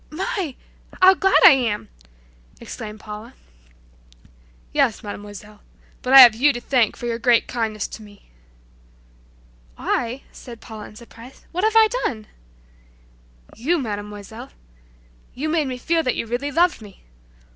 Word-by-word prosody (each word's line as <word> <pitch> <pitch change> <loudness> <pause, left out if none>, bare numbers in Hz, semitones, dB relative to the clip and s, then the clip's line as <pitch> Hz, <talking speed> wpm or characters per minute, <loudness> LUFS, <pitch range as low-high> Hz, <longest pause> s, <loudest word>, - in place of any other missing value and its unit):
"My! 340 -2 -4 0.4
How 375 +1 +7
glad 385 +1 +2
I 390 - +11
am!" 240 -6 -1 0.7
exclaimed 215 -1 -9
Paula. 215 +4 -10 1.4
"Yes, 220 - +1
Mademoiselle, 205 0 -10 0.4
but 255 - -3
I 270 0 +11
have 240 -3 +9
you 270 +6 +3
to 240 - -5
thank 240 -3 0
for - - -7
your 235 -1 -3
great 240 -1 +3
kindness 220 -3 -3
to - - -10
me." 205 -1 -17 1.5
"I," 245 +2 -2
said 235 -3 -12
Paula 215 -1 -11
surprised; 235 +2 -15
"why 355 - -3
what - - +1
have 440 0 +1
I 445 -1 +7 0.2
done?" 220 - -3 1.3
"You, 315 +10 0
Mademoiselle! 210 - -7 0.9
You 300 +5 -3
made 310 -3 0
me 255 -1 -5
feel 330 +6 0
that 255 -5 -1
you - - -3
really 245 +5 -3
loved 340 -2 +1
me. 205 -3 -15
240 Hz, 140 wpm, -21 LUFS, 215-290 Hz, 1.5 s, I